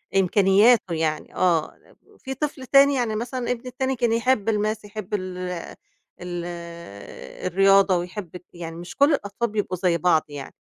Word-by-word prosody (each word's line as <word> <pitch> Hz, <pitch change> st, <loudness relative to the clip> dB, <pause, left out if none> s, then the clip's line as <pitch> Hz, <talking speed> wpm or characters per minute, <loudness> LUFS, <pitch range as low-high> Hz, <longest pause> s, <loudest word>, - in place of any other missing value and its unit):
إمكانياته 195 Hz, +2 st, +4 dB
يعني 155 Hz, -1 st, -2 dB
آه 170 Hz, -4 st, +1 dB, 0.4 s
في 265 Hz, -1 st, -5 dB
طفل 280 Hz, -1 st, -4 dB
تاني 275 Hz, +1 st, +5 dB
يعني 235 Hz, -4 st, -1 dB
مثلًا 245 Hz, +2 st, -3 dB
ابني 245 Hz, +1 st, -4 dB
التاني 265 Hz, +1 st, -2 dB
كان 235 Hz, -1 st, +1 dB
يحب 230 Hz, -2 st, +1 dB
الmath 215 Hz, 0 st, -1 dB
يحب 210 Hz, -1 st, -8 dB
ال 185 Hz, -2 st, -3 dB, 0.8 s
ال 175 Hz, -1 st, -5 dB, 1.0 s
الرياضة 195 Hz, 0 st, +4 dB
ويحب 180 Hz, +1 st, -5 dB, 0.2 s
يعني 165 Hz, -1 st, -7 dB
مش 175 Hz, +1 st, -9 dB
كل 285 Hz, +2 st, +4 dB
الأطفال 210 Hz, -1 st, -2 dB
بيبقوا 205 Hz, -4 st, -2 dB
زي 175 Hz, -2 st, +1 dB
بعض 160 Hz, -1 st, +3 dB
يعني. 145 Hz, -2 st, -8 dB
205 Hz, 145 wpm, -23 LUFS, 180-240 Hz, 1.0 s, تاني